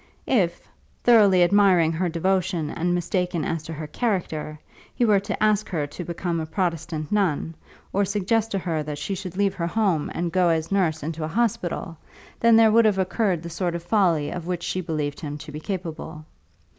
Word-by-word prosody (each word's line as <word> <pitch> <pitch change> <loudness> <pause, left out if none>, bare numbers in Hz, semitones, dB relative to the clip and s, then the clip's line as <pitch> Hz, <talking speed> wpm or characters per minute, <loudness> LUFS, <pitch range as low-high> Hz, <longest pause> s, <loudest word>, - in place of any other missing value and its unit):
If, 175 -8 0 0.4
thoroughly 205 -6 +6
admiring 180 -3 +4
her 175 +2 -1
devotion 175 -2 0
and 175 +1 0
mistaken 175 -1 -1
as 165 -1 -2
to 165 - -6
her 155 0 -6
character, 160 -5 -2 0.4
he 245 - +2
were 210 -3 +4
to 200 +2 -3
ask 215 -1 +2
her 155 -5 -1
to 145 +5 -7
become 170 0 -3
a 160 - -4
Protestant 165 -3 -2
nun, 180 -6 0 0.4
or 200 - +2
suggest 205 +3 0
to 200 - -1
her 170 -4 -2
that 150 -1 -5
she 155 +7 -3
should 185 -1 -6
leave 200 -1 +2
her 170 -2 -2
home 185 -6 0
and 170 0 -2
go 180 0 +3
as 160 +1 0
nurse 165 -6 +1
into 160 +1 -4
a - - -1
hospital, 175 -5 -2 0.4
then 230 0 +5
there 225 -1 +6
would 230 +1 +5
have 210 -3 +3
occurred 190 -2 0
the 170 - -6
sort 175 0 -2
of 170 - -5
folly 175 -6 +2
of 175 -1 -6
which 175 -1 -3
she 185 - -2
believed 150 -4 -3
him 145 -2 -5
to - - -10
be 150 - -6
capable. 160 -3 -6
175 Hz, 195 wpm, -24 LUFS, 160-195 Hz, 0.4 s, thoroughly